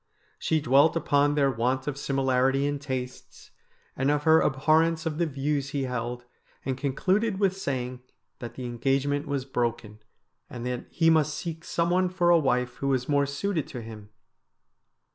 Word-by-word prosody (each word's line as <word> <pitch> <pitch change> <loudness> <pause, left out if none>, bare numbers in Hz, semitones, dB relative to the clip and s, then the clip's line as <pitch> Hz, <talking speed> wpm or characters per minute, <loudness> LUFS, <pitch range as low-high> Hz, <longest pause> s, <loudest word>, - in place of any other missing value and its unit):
She 160 - +1
dwelt 140 +4 +4
upon 145 -2 +2
their 140 -2 +3
want 130 +2 -1
of 145 - -3
similarity 135 -1 +1
in 145 0 -1
tastes, 130 -2 -7 0.4
and 135 +1 0
of 145 0 +1
her 160 +1 +5
ab 135 - +1
horrence 160 +1 +3
of 160 -1 -2
the 170 - +2
views 140 -1 -2
he 140 0 -2
held, 120 -1 -4 0.4
and 130 0 -1
concluded 190 - 0
with 195 -2 +2
sayino 130 -8 -4 0.4
that 120 - -8
the 130 - -6
engagement 135 +4 0
was 140 -2 -2
broken, 115 -5 -3 0.5
and 120 -1 -7
that 125 -1 -4
he 165 -1 +3
must 155 -2 +2
seek 165 -1 -5
some 170 0 -1
one 185 0 +2
for 175 -1 +2
a 170 - +6
wife 125 -3 0
who 140 - -3
was 130 -2 0
more 140 -1 +2
suited 155 +3 -2
to 125 - -7
him. 110 -2 -10
140 Hz, 175 wpm, -27 LUFS, 125-160 Hz, 0.5 s, a